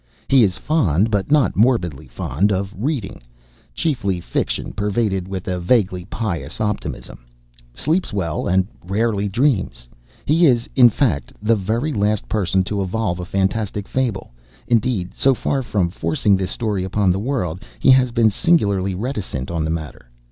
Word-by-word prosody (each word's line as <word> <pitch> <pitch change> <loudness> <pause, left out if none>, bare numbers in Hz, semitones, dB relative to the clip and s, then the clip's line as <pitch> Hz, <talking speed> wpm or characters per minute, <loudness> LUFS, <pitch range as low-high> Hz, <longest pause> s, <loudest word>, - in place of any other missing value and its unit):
He 135 -3 +5
is 95 -3 +1
fond, 110 - +1
but 100 +1 0
not 150 -3 +3
morbidly 90 - +1
fond, 80 +11 -1
of 100 +1 -2
reading, 120 -2 -3 0.5
chiefly 110 - -1
fiction - - -3
pervaded 100 -2 -1
with 95 -1 -5
a 90 -1 -1
vaguely 90 -2 +1
pious 100 -6 -4
optimism, 105 -1 -3 0.6
sleeps 160 - 0
well, 85 -6 -2
and 95 +1 +2 0.2
rarely 105 +2 0
dreams. 95 - 0 0.4
He 165 +3 +4
is, 120 -3 +2
in 125 -3 +8
fact, 110 - -1
the 110 +2 +2
very 115 +9 -1
last 105 -1 0
person 95 -3 +1
to 100 +1 -2
evolve 95 -2 -2
a 90 - -4
fantastic 100 +2 -1
fable. 125 - -2 0.3
Indeed, 115 -5 0
so 135 -1 +3
far 135 +3 -1
from 100 -8 -1
forcing 85 +5 +1
this 95 -1 -2
story 105 -5 -1
upon 95 0 +1
the 95 - 0
world, 100 - -2 0.2
he 135 - +5
has 130 -1 +5
been 115 -2 +3
singularly 100 - +1
reticent 95 - -4
on 85 -2 -1
the 80 - -2
matter. 80 -6 -5
100 Hz, 155 wpm, -20 LUFS, 90-120 Hz, 0.6 s, in